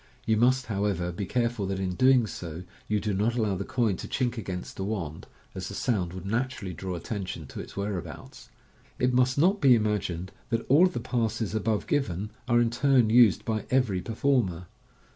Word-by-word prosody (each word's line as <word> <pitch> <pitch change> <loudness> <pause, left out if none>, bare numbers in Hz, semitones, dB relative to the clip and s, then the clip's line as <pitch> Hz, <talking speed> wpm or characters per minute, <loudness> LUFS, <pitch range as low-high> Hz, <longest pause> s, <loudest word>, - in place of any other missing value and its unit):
You 110 - +3
must, 125 +3 +3
however, 100 -4 -1
be 95 +2 -4
careful 120 -4 0
that, 95 0 -2
in 95 -1 -1
doing 130 +3 +4
so, 85 -4 -7 0.2
you 105 0 +1
do 105 0 -2
not 105 +5 +1
allow 110 -4 +1
the 95 - -3
coin 115 -4 0
to - - -7
chink 125 -2 -1
against 95 -6 -5
the 95 - -4
wand, 95 -7 -4 0.3
as 95 -1 -5
the 100 - -7
sound 95 -9 -1
would 95 0 -7
naturally 115 -3 -2
draw 90 +2 -5
attention 90 -2 -5
to - - -9
its - - -9
whereabouts. 100 -3 -6 0.5
It 125 0 +1
must 125 +1 +3
not 190 +7 +3
be 135 -4 +7
imagined 100 -5 -1 0.2
that 115 -1 -1
all 155 +8 +7
of 180 - -6
the - - -2
passes 115 -4 -1
above 110 0 0
given 105 - -1 0.2
are 120 -1 +4
in 120 -1 +2
turn 125 -2 +3
used 115 -4 +5
by 110 -1 -2
every 120 -8 +1
performer. 110 -6 0
110 Hz, 195 wpm, -27 LUFS, 95-125 Hz, 0.5 s, be